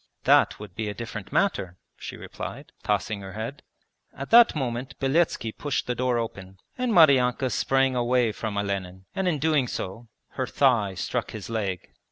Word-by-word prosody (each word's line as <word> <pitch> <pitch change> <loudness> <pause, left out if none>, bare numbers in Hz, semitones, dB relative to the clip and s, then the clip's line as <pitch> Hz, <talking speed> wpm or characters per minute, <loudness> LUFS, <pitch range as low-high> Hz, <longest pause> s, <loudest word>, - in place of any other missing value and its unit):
'That - - +4
would 105 -3 -9
be 110 +2 -3
a 105 - -5
different 105 -4 -7
matter,' 95 - 0 0.2
she - - -8
replied, - - -8
tossing 105 -2 -1
her 95 -1 -8
head. 110 +6 -5 0.6
At 140 - -6
that 235 -4 +8
moment 130 -1 -3
Beletski 135 -4 +1
pushed 145 +3 -2
the 125 - -1
door 125 0 0
open, 100 -5 -5 0.2
and 250 -1 -1
Maryanka 135 - +5
sprang 135 -1 +2
away 120 -1 +2
from 105 -1 -4
Olenin 95 -2 -3
and 190 -1 -1
in 170 -4 +1
doing 150 -3 +2
so 110 +2 -5 0.2
her - - -3
thigh 115 -8 +2
struck 115 +6 -2
his 110 0 -7
leg. 100 -5 -3
120 Hz, 170 wpm, -26 LUFS, 100-135 Hz, 0.6 s, that